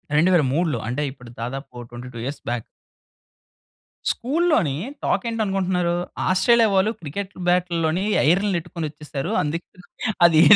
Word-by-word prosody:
2003లో. 155 Hz, -3 st, +3 dB
అంటే 125 Hz, +5 st, -1 dB
ఇప్పుడు 125 Hz, -3 st, -13 dB
దాదాపు 135 Hz, +4 st, -4 dB
ఓ -, -, -6 dB
22 120 Hz, 0 st, -8 dB
ఇయర్స్ 140 Hz, +1 st, -5 dB
బ్యాక్. 120 Hz, -2 st, -2 dB, 1.5 s
స్కూల్లోని 265 Hz, -, +1 dB, 0.3 s
టాకేంటనుకుంటున్నారు. 195 Hz, -6 st, 0 dB, 0.3 s
"ఆస్ట్రేలియా 230 Hz, +5 st, +5 dB
వాళ్ళు 195 Hz, +3 st, +3 dB
క్రికెట్ 190 Hz, +6 st, -5 dB, 0.2 s
బాటుల్లోని 175 Hz, 0 st, +2 dB, 0.2 s
ఐరన్లని 190 Hz, +3 st, +3 dB
యెట్టుకొనొచ్చేసారు. 155 Hz, -4 st, -5 dB
అందుకే 160 Hz, +4 st, -3 dB, 0.6 s
అదీ 160 Hz, -2 st, +6 dB
170 Hz, 100 wpm, -23 LUFS, 140-190 Hz, 1.5 s, అదీ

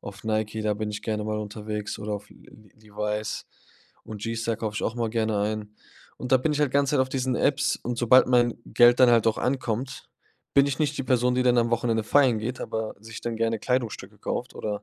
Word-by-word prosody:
auf 100 Hz, -1 st, -10 dB
Nike, 110 Hz, 0 st, -1 dB
da 105 Hz, -1 st, +1 dB
bin 105 Hz, 0 st, -3 dB
ich 105 Hz, -, -6 dB
gerne 105 Hz, -1 st, -2 dB
mal 105 Hz, 0 st, -2 dB
unterwegs 105 Hz, 0 st, -5 dB
oder 105 Hz, +1 st, -4 dB
auf 105 Hz, 0 st, -8 dB
L-L-Levi's 105 Hz, 0 st, -6 dB, 0.6 s
und 105 Hz, -2 st, -8 dB
G-Star 115 Hz, 0 st, -2 dB
kaufe 110 Hz, -1 st, -4 dB
ich -, -, -3 dB
auch 115 Hz, -, -1 dB
immer 115 Hz, -2 st, -1 dB
gerne 110 Hz, -2 st, 0 dB
ein. 105 Hz, 0 st, -3 dB, 0.4 s
Und 125 Hz, -, -6 dB
da -, -, +8 dB
bin 150 Hz, +5 st, 0 dB
ich 150 Hz, -, -1 dB
halt 145 Hz, -, +2 dB
die -, -, -18 dB
ganze 140 Hz, -1 st, +3 dB
Zeit 140 Hz, -, +3 dB
auf 130 Hz, -, +1 dB
diesen 130 Hz, -1 st, -1 dB
Apps 145 Hz, -, +1 dB
und 120 Hz, 0 st, -3 dB
sobald 125 Hz, +2 st, +6 dB
mein 120 Hz, -2 st, +3 dB
Geld 120 Hz, 0 st, +5 dB
dann 125 Hz, -1 st, +7 dB
halt 115 Hz, -2 st, +4 dB
auch 110 Hz, -, +2 dB
ankommt, 125 Hz, 0 st, -2 dB, 0.5 s
bin 140 Hz, 0 st, +6 dB
ich 140 Hz, -2 st, -2 dB
nicht 150 Hz, -1 st, 0 dB
die 135 Hz, -, -2 dB
Person, 125 Hz, 0 st, +2 dB
die 125 Hz, -, +2 dB
dann 125 Hz, -1 st, +4 dB
am 115 Hz, 0 st, +2 dB
Wochenende 115 Hz, -1 st, +1 dB
feiern 130 Hz, -1 st, +4 dB
geht, 125 Hz, +4 st, -4 dB
aber 110 Hz, -1 st, -3 dB
sich 110 Hz, 0 st, -9 dB
dann 115 Hz, -1 st, -3 dB
gerne 115 Hz, 0 st, 0 dB
Kleidungsstücke 125 Hz, -4 st, -2 dB
kauft -, -, -4 dB
oder 105 Hz, -1 st, -4 dB
115 Hz, 225 wpm, -26 LUFS, 105-125 Hz, 0.6 s, da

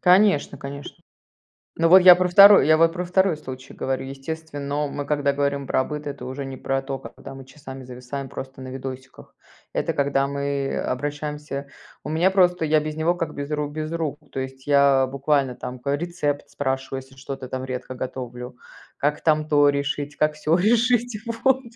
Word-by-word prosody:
Конечно 180 Hz, -7 st, +4 dB
конечно. 140 Hz, +1 st, -8 dB, 0.8 s
Ну 165 Hz, 0 st, +4 dB
вот 185 Hz, +2 st, +9 dB
я 180 Hz, -1 st, +9 dB
про 180 Hz, 0 st, +1 dB
2, 200 Hz, -3 st, +8 dB
я 155 Hz, -, +6 dB
вот 165 Hz, 0 st, +4 dB
про 180 Hz, 0 st, -3 dB
2 180 Hz, -2 st, +2 dB
случай 130 Hz, -2 st, -9 dB
говорю. 130 Hz, 0 st, -2 dB
Естественно, 145 Hz, +1 st, -4 dB
мы 145 Hz, 0 st, -5 dB
когда 145 Hz, -1 st, +1 dB
говорим 140 Hz, -1 st, -1 dB
про 130 Hz, -, +2 dB
быт, 150 Hz, 0 st, -6 dB
это 140 Hz, -3 st, -6 dB
уже 130 Hz, +2 st, -5 dB
не 135 Hz, -1 st, -7 dB
про 135 Hz, 0 st, -1 dB
то, 135 Hz, 0 st, -4 dB
когда 135 Hz, -, -11 dB
мы 135 Hz, -1 st, -11 dB
часами 135 Hz, -1 st, -10 dB
зависаем 125 Hz, +2 st, -7 dB
просто 130 Hz, 0 st, -8 dB
на 130 Hz, -, -7 dB
видосиках. 130 Hz, 0 st, -9 dB, 0.4 s
Это -, -, -1 dB
когда 140 Hz, -1 st, +1 dB
мы 140 Hz, -1 st, -2 dB
обращаемся 145 Hz, +1 st, -4 dB, 0.4 s
у -, -, -6 dB
меня 170 Hz, +5 st, +2 dB
просто, 180 Hz, -3 st, +3 dB
я 155 Hz, 0 st, +3 dB
без 155 Hz, 0 st, -5 dB
него 160 Hz, +2 st, +1 dB
как 165 Hz, -3 st, -4 dB
без 145 Hz, +1 st, -5 dB
ру 150 Hz, -1 st, -1 dB
без 155 Hz, +1 st, -5 dB
рук, 160 Hz, -3 st, -2 dB
то 135 Hz, -, -4 dB
есть 130 Hz, 0 st, -7 dB
я 140 Hz, -2 st, +5 dB
буквально 140 Hz, 0 st, 0 dB
там 125 Hz, 0 st, -7 dB
ка 140 Hz, +3 st, -1 dB
рецепт 150 Hz, -3 st, -3 dB
спрашиваю, 135 Hz, -1 st, -3 dB
если 135 Hz, 0 st, -20 dB
что-то 135 Hz, 0 st, -7 dB
там 130 Hz, 0 st, -4 dB
редко 130 Hz, 0 st, -5 dB
готовлю, 125 Hz, -1 st, -6 dB, 0.4 s
как 145 Hz, +1 st, 0 dB
там 155 Hz, -1 st, +2 dB
то 145 Hz, -1 st, +5 dB
решить, 140 Hz, +1 st, -2 dB
как 150 Hz, 0 st, +1 dB
сё 155 Hz, +2 st, +1 dB
решить, 235 Hz, +3 st, +2 dB, 0.3 s
вот. 265 Hz, 0 st, +4 dB
145 Hz, 185 wpm, -23 LUFS, 135-155 Hz, 0.8 s, вот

